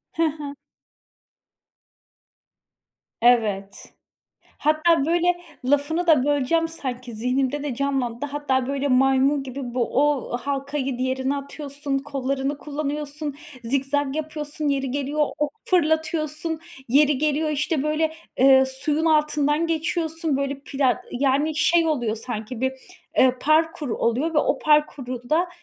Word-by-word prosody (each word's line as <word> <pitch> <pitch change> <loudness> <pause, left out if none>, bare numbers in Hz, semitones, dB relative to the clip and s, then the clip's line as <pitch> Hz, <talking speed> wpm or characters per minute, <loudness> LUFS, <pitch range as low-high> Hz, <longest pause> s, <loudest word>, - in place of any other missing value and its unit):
He 330 -1 +2
he. 295 -2 -7 2.7
Evet. 210 -5 +1 0.6
Hatta, 310 0 +3
böyle, 345 +2 +2 0.4
lafını 290 +6 +1
da 300 -6 +5
böleceğim, 290 +3 +2
sanki 255 -6 -6
zihnimde 260 +5 0
de 285 -4 -3
canlandı. 270 -2 -1
Hatta, 275 -3 -1
böyle, 280 +1 -1
maymun 270 +2 +3
gibi 265 0 -7
bu, 245 -1 -1
o 275 -4 -1
halkayı 275 0 -3
diğerine 260 +2 -1
atıyorsun, 280 0 -4
kollarını 275 0 -2
kullanıyorsun, 295 0 -4 0.3
zikzak 275 +3 0
yapıyorsun, 305 -1 -4
yeri 270 -2 0
geliyor 285 +2 0
ok 295 -1 0
fırlatıyorsun. 315 -1 0 0.3
Yeri 290 +2 +4
geliyor, 305 +2 +1
işte, 295 0 0
böyle, 305 +1 +1 0.3
eee, 265 0 +6
suyun 290 +4 0
altından 300 0 +2
geçiyorsun 325 -2 -1
böyle 275 0 -2
pla 270 -2 0
yani 280 +4 +1
şey 330 +1 +3
oluyor 240 -8 0
sanki 225 +1 -6
bir, 260 0 +1 0.5
eee, 255 -1 +6
parkur 310 -1 +2
oluyor 245 +8 0
ve 300 - +1
o - - +2
parkuru 265 -5 +1
da 335 +4 +2
285 Hz, 120 wpm, -23 LUFS, 265-305 Hz, 2.7 s, eee